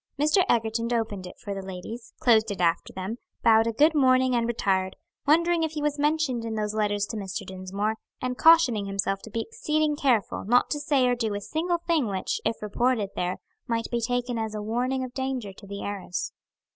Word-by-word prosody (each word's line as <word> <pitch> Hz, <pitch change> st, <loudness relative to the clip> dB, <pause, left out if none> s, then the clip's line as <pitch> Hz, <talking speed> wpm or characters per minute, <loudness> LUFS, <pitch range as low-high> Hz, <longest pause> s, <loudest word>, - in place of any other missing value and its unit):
Mr. 305 Hz, +6 st, +4 dB
Egerton 230 Hz, 0 st, +1 dB
opened 215 Hz, -5 st, -2 dB
it -, -, -11 dB
for 200 Hz, -, -6 dB
the 195 Hz, -, -5 dB
ladies, 190 Hz, +5 st, -8 dB
closed 225 Hz, -2 st, +4 dB
it 200 Hz, -, -4 dB
after 170 Hz, -1 st, +1 dB
them, 190 Hz, +6 st, -5 dB, 0.2 s
bowed 225 Hz, 0 st, +5 dB
a -, -, +1 dB
good 300 Hz, +8 st, +4 dB
morning 260 Hz, -3 st, +4 dB
and 235 Hz, -1 st, +1 dB
retired, 190 Hz, -5 st, 0 dB, 0.3 s
wondering 335 Hz, +3 st, +4 dB
if 320 Hz, -1 st, -1 dB
he 300 Hz, -, -3 dB
was 295 Hz, -1 st, 0 dB
mentioned 295 Hz, -5 st, +1 dB
in 225 Hz, -1 st, -3 dB
those 210 Hz, -1 st, -1 dB
letters 205 Hz, -1 st, 0 dB
to 225 Hz, -, -6 dB
Mr. 195 Hz, -3 st, -4 dB
Dinsmore, 195 Hz, +3 st, -3 dB, 0.2 s
and 255 Hz, 0 st, -2 dB
cautioning 255 Hz, -11 st, +5 dB
himself 195 Hz, 0 st, -1 dB
to -, -, -10 dB
be 225 Hz, +2 st, -2 dB
exceeding 310 Hz, -10 st, 0 dB
careful 250 Hz, -8 st, +1 dB
not 245 Hz, +5 st, +3 dB
to 295 Hz, -, 0 dB
say 285 Hz, -3 st, +2 dB
or 245 Hz, -, +3 dB
do 225 Hz, -4 st, -1 dB
a -, -, -2 dB
single 335 Hz, -, -1 dB
thing 335 Hz, -6 st, 0 dB
which, 190 Hz, -2 st, -2 dB
if 225 Hz, -, -2 dB
reported 215 Hz, -1 st, 0 dB
there, 180 Hz, +1 st, -1 dB, 0.3 s
might 230 Hz, -1 st, -2 dB
be 235 Hz, -1 st, 0 dB
taken 245 Hz, 0 st, -1 dB
as 220 Hz, -1 st, -3 dB
a 210 Hz, -, -3 dB
warning 250 Hz, +4 st, -1 dB
of 250 Hz, -1 st, -6 dB
danger 260 Hz, -6 st, -3 dB
to 200 Hz, +1 st, -14 dB
the 200 Hz, 0 st, -6 dB
heiress. 195 Hz, -3 st, -4 dB
230 Hz, 210 wpm, -26 LUFS, 205-265 Hz, 0.3 s, bowed